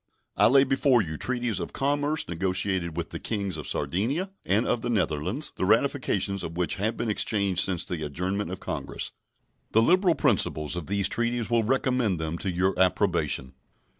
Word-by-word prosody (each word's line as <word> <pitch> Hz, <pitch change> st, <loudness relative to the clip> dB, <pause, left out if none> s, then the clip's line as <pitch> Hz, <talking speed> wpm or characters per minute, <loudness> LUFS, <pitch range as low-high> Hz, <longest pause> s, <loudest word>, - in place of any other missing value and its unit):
I -, -, +5 dB
lay 135 Hz, +2 st, +6 dB
before 135 Hz, -3 st, +3 dB
you 80 Hz, -3 st, -5 dB
treaties 120 Hz, +1 st, -1 dB
of -, -, -5 dB
commerce 145 Hz, +2 st, 0 dB
negotiated 90 Hz, -1 st, -1 dB
with 85 Hz, -1 st, -3 dB
the -, -, -5 dB
Kings 100 Hz, -5 st, -2 dB
of 75 Hz, -, -6 dB
Sardinia 140 Hz, -, -1 dB
and 105 Hz, +5 st, +2 dB
of 120 Hz, -, 0 dB
the 120 Hz, -, -3 dB
Netherlands, 95 Hz, -, -1 dB
the -, -, -2 dB
ratifications 105 Hz, -3 st, +1 dB
of 85 Hz, +1 st, -6 dB
which 90 Hz, -1 st, 0 dB
have 110 Hz, +4 st, -1 dB
been 115 Hz, -, -1 dB
exchanged 100 Hz, -3 st, 0 dB
since 90 Hz, -3 st, +1 dB
the 85 Hz, -3 st, -4 dB
adjournment 90 Hz, +6 st, -2 dB
of 95 Hz, -, -5 dB
Congress. -, -, -4 dB, 0.6 s
The 110 Hz, -, +5 dB
liberal 180 Hz, -, +4 dB
principles 90 Hz, -, +1 dB
of 85 Hz, -4 st, -5 dB
these 100 Hz, -1 st, +1 dB
treaties 120 Hz, -1 st, -1 dB
will 115 Hz, -1 st, +4 dB
recommend 125 Hz, -4 st, +1 dB
them 80 Hz, +1 st, -3 dB
to 95 Hz, -, -2 dB
your 90 Hz, +2 st, +1 dB
approbation. 80 Hz, -7 st, +1 dB
100 Hz, 175 wpm, -26 LUFS, 90-120 Hz, 0.6 s, lay